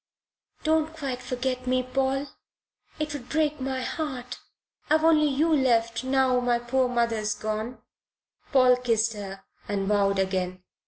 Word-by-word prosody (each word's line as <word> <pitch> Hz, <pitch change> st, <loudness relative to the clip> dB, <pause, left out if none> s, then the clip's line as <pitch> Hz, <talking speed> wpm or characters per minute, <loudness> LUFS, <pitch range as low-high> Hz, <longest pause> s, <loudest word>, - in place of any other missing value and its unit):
"Don't 315 Hz, 0 st, +1 dB
quite 265 Hz, -4 st, -4 dB
forget 255 Hz, 0 st, -3 dB
me, 255 Hz, 0 st, +2 dB
Paul. 270 Hz, +2 st, 0 dB, 0.7 s
It 305 Hz, -1 st, -3 dB
would 255 Hz, -4 st, -7 dB
break 305 Hz, -2 st, 0 dB
my 260 Hz, 0 st, -2 dB
heart. 255 Hz, -4 st, -4 dB, 0.5 s
I've 310 Hz, +1 st, +3 dB
only 310 Hz, -2 st, +5 dB
you 310 Hz, +4 st, +2 dB
left 230 Hz, -4 st, +2 dB
now 255 Hz, -2 st, +2 dB
poor 250 Hz, +2 st, 0 dB
mother's 230 Hz, -3 st, 0 dB
gone." 215 Hz, +3 st, -4 dB, 0.7 s
Paul 255 Hz, -3 st, +5 dB
kissed 230 Hz, -2 st, +1 dB
her 195 Hz, -2 st, -8 dB, 0.2 s
and 195 Hz, -1 st, -1 dB
vowed 200 Hz, -1 st, +2 dB
again. 185 Hz, -1 st, -1 dB
250 Hz, 130 wpm, -26 LUFS, 225-270 Hz, 0.7 s, only